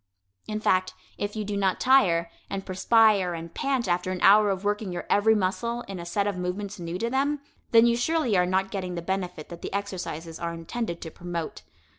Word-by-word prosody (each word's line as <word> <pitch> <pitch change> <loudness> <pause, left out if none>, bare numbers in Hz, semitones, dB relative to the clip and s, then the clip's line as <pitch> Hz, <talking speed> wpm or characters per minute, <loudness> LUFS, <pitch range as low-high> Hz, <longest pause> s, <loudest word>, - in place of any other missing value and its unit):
In 215 0 -2
fact, 185 -3 +1 0.2
if 205 +1 -3
you 215 -1 -3
do 205 0 -3
not 195 -2 +1
tire, 175 -11 +4 0.2
and 195 -1 -4
perspire 195 -1 +3
and 165 0 -8
pant 265 -5 -1
after 180 +1 0
an 185 - -3
hour 210 +1 +7
of 195 0 -2
working 205 -1 -1
your 175 - -5
every 220 +2 +5
muscle 235 +5 -1
in 195 -5 -7
a 170 - -7
set 200 +3 0
of 205 -2 -1
movements 190 +2 -4
new 170 0 -4
to 230 +5 -2
them, 285 +3 +1 0.3
then 230 0 +7
you 235 0 +4
surely 250 -2 +1
are 180 -1 +3
not 190 +1 0
getting 185 -3 -3
the 170 - -4
benefit 180 -4 -3
that 170 - -9
the - - -5
exercises 175 -5 -4
are 170 0 -3
intended 170 +2 -4
to 160 - -7
promote. 170 -1 -5
195 Hz, 210 wpm, -26 LUFS, 175-215 Hz, 0.3 s, hour